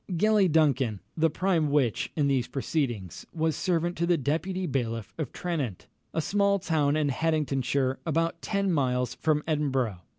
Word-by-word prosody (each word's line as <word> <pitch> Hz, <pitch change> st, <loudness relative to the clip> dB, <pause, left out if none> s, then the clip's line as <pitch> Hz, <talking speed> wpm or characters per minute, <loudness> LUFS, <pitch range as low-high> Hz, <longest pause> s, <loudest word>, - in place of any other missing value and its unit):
Gellie 200 Hz, +1 st, +3 dB
Duncan, 135 Hz, -9 st, +2 dB, 0.2 s
the 165 Hz, 0 st, +3 dB
prime 165 Hz, -2 st, +1 dB
witch 140 Hz, -6 st, +1 dB
in 145 Hz, -3 st, +2 dB
these 135 Hz, -3 st, +1 dB
proceedings, 120 Hz, -, -2 dB
was 160 Hz, -1 st, 0 dB
servant 175 Hz, -1 st, 0 dB
to 170 Hz, -, +1 dB
the 175 Hz, -1 st, +3 dB
deputy 165 Hz, +7 st, -1 dB
bailiff 115 Hz, -, -2 dB
of 150 Hz, -6 st, -3 dB
Tranent, 145 Hz, -, -3 dB, 0.3 s
a 165 Hz, -, -1 dB
small 200 Hz, +3 st, +2 dB
town 150 Hz, -5 st, +1 dB
in 150 Hz, -2 st, +1 dB
Haddingtonshire, 140 Hz, -3 st, 0 dB
about 165 Hz, 0 st, -1 dB
ten 200 Hz, -2 st, 0 dB
miles 125 Hz, -4 st, 0 dB
from 150 Hz, -1 st, 0 dB
Edinburgh. 135 Hz, -, 0 dB
150 Hz, 155 wpm, -27 LUFS, 130-170 Hz, 0.3 s, Gellie